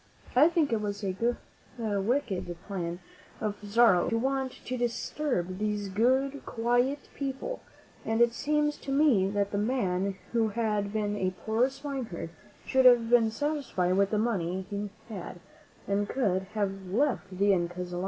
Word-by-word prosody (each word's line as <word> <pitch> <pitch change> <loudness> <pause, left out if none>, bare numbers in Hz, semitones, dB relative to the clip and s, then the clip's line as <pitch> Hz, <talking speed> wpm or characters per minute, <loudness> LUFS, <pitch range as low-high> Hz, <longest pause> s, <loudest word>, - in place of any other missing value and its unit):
I 280 +5 +7
think 330 -5 +1
that 225 - +3
it - - -4
was 205 0 -4 0.7
wicked 215 -1 -1 0.9
of 205 -2 -3
Pizarro 205 -3 +4
to 230 - +1
want 265 +1 -1
to 255 - -2
disturb 240 - -2
these 210 -1 -1
good, 260 +7 +1
quiet 245 +4 0
people, 280 - -4 0.4
and 225 +1 0
it 235 0 +5
seems 295 +2 0
to 275 - -6
me 270 -10 +4
that 200 0 0
the 200 - 0
man 200 -5 0 0.2
who 230 -2 +2
had 210 -2 -1
been 210 -1 -1
a 185 -2 -1
poor 225 +4 +3
swineherd 270 - -5 0.3
should 260 0 +3
have 240 -2 +6
been 235 -2 +5
satisfied 225 -8 -1
with 200 0 +3
the 215 - 0
money 190 -5 -1
he 205 0 -3 0.2
had, 185 -5 -7 0.5
and 200 +1 0
could 190 -7 0
have 195 -2 -2
left 200 -3 0
the 200 +1 +4
Incas 175 0 -2
alone. 175 - -2
220 Hz, 155 wpm, -29 LUFS, 200-260 Hz, 0.9 s, I